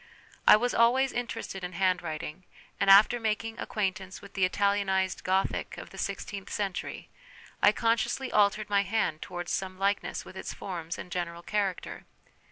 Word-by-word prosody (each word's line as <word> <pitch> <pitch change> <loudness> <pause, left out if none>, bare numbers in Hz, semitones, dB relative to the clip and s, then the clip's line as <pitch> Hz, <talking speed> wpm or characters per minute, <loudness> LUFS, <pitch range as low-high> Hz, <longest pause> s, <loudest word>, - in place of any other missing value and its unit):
I - - +11
was 245 +3 0
always 255 +3 +4
interested 230 -5 -4
in 180 0 -5
handwriting, 175 -2 -1 0.4
and 200 -1 +2
after 210 +5 +7
making 225 0 -2
acquaint 205 -1 -1
ance 190 0 -9
with 200 - -13
the 190 -2 +3
Italianised 190 -2 +1
Gothic 190 +1 0
of - - -9
the - - -10
sixteenth 200 -2 -4
century, 195 -3 -4 0.5
I 205 - +7
consciously 230 +4 0
altered 210 0 +3
my 200 -1 +3
hand 195 -6 -1
towards 175 -1 -5
some 185 -1 -2
likeness 200 +1 -1
with - - -12
its - - -6
forms 170 -3 -5
and 180 - -9
general 170 -1 -4
character. 200 -2 -2
195 Hz, 160 wpm, -29 LUFS, 185-215 Hz, 0.5 s, I